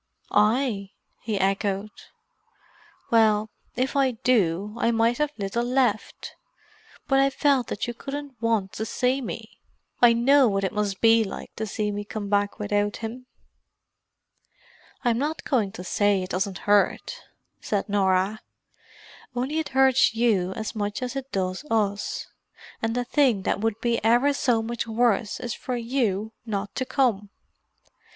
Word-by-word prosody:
"I?" 210 Hz, -2 st, +1 dB, 0.3 s
he 215 Hz, -2 st, -2 dB
echoed. 195 Hz, +1 st, 0 dB, 1.2 s
"Well, 215 Hz, -2 st, +3 dB, 0.2 s
if 255 Hz, +3 st, -1 dB
I 275 Hz, -1 st, +4 dB
do, 210 Hz, -4 st, +1 dB
I -, -, +1 dB
have 235 Hz, -, +2 dB
mighty 235 Hz, +6 st, +2 dB
little 205 Hz, +3 st, -2 dB
left. 255 Hz, +1 st, -1 dB, 0.7 s
But 270 Hz, -1 st, +3 dB
I 275 Hz, 0 st, +4 dB
felt 275 Hz, -3 st, +2 dB
that -, -, -3 dB
you 240 Hz, -, -4 dB
couldn't 285 Hz, +3 st, -6 dB
want 225 Hz, -5 st, +1 dB
to 220 Hz, -, -3 dB
see 255 Hz, +5 st, 0 dB
me. 245 Hz, -, -7 dB, 0.4 s
I 240 Hz, -1 st, +7 dB
know 265 Hz, +3 st, +5 dB
what 195 Hz, -2 st, 0 dB
it 190 Hz, -, -1 dB
must 205 Hz, -2 st, -2 dB
be 225 Hz, 0 st, +6 dB
like 195 Hz, -, -8 dB
to 220 Hz, -, -3 dB
see 210 Hz, +1 st, -2 dB
me 205 Hz, 0 st, -4 dB
come 205 Hz, -1 st, -6 dB
back 205 Hz, 0 st, +1 dB
without 205 Hz, 0 st, -1 dB
him." 250 Hz, +3 st, -7 dB, 1.8 s
"I'm 240 Hz, -2 st, +2 dB
not 300 Hz, +3 st, -2 dB
going 225 Hz, -8 st, 0 dB
to 180 Hz, -, -7 dB
say 200 Hz, 0 st, +1 dB
it 185 Hz, -, -7 dB
doesn't 190 Hz, 0 st, -1 dB
hurt," 205 Hz, -1 st, +2 dB, 0.4 s
said 200 Hz, -1 st, -2 dB
Norah. 195 Hz, +1 st, +1 dB, 0.9 s
"Only 265 Hz, +6 st, -1 dB
it 315 Hz, -, -3 dB
hurts 265 Hz, -3 st, +4 dB
you 210 Hz, -6 st, +2 dB
as 220 Hz, +2 st, -5 dB
much 205 Hz, +2 st, -3 dB
as 250 Hz, +1 st, -4 dB
it 270 Hz, -1 st, -5 dB
does 185 Hz, +3 st, -2 dB
us. 205 Hz, -2 st, -1 dB, 0.6 s
And 225 Hz, +1 st, -1 dB
the 245 Hz, 0 st, -1 dB
thing 250 Hz, -8 st, +2 dB
that 200 Hz, -, -1 dB
would 225 Hz, -1 st, -1 dB
be 235 Hz, -2 st, 0 dB
ever 240 Hz, +6 st, +4 dB
so 240 Hz, -5 st, +1 dB
much 235 Hz, +1 st, -3 dB
worse 225 Hz, -2 st, +1 dB
is 240 Hz, -3 st, -4 dB
for 255 Hz, -, -4 dB
you 230 Hz, -4 st, -1 dB
not 205 Hz, -3 st, -4 dB
to 260 Hz, -, -3 dB
come. 235 Hz, -7 st, +1 dB
225 Hz, 155 wpm, -25 LUFS, 205-250 Hz, 1.8 s, I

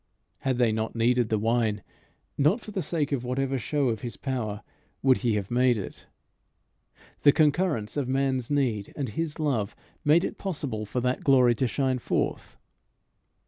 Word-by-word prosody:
Had 130 Hz, -2 st, -1 dB
they 120 Hz, -3 st, +3 dB
not 110 Hz, +1 st, -2 dB
needed 120 Hz, 0 st, +2 dB
the 110 Hz, -, +2 dB
wine, 110 Hz, -1 st, 0 dB, 0.5 s
not 150 Hz, -, +3 dB
for 220 Hz, -, -10 dB
the 195 Hz, -, -2 dB
sake 155 Hz, -5 st, -1 dB
of 135 Hz, -4 st, -1 dB
whatever 135 Hz, +1 st, -1 dB
show 140 Hz, +2 st, 0 dB
of 110 Hz, -2 st, -2 dB
his 120 Hz, -2 st, -6 dB
power 115 Hz, -7 st, -3 dB, 0.4 s
would 130 Hz, -1 st, +4 dB
he 120 Hz, -3 st, +1 dB
have 100 Hz, 0 st, -3 dB
made 125 Hz, 0 st, +3 dB
it. 100 Hz, -, -7 dB, 1.1 s
The 145 Hz, -, +7 dB
concurrence 150 Hz, -, +1 dB
of 140 Hz, -3 st, 0 dB
man's 130 Hz, -2 st, 0 dB
need 125 Hz, -8 st, 0 dB
and 135 Hz, -5 st, -3 dB
his 155 Hz, +7 st, -3 dB
love 130 Hz, -10 st, -1 dB, 0.3 s
made 155 Hz, +3 st, +5 dB
it -, -, -4 dB
possible 140 Hz, -, -3 dB
for 125 Hz, -, -2 dB
that 125 Hz, +1 st, -1 dB
glory 130 Hz, -3 st, +5 dB
to 130 Hz, +2 st, 0 dB
shine 130 Hz, 0 st, 0 dB
forth. -, -, -2 dB
130 Hz, 170 wpm, -27 LUFS, 115-145 Hz, 1.1 s, The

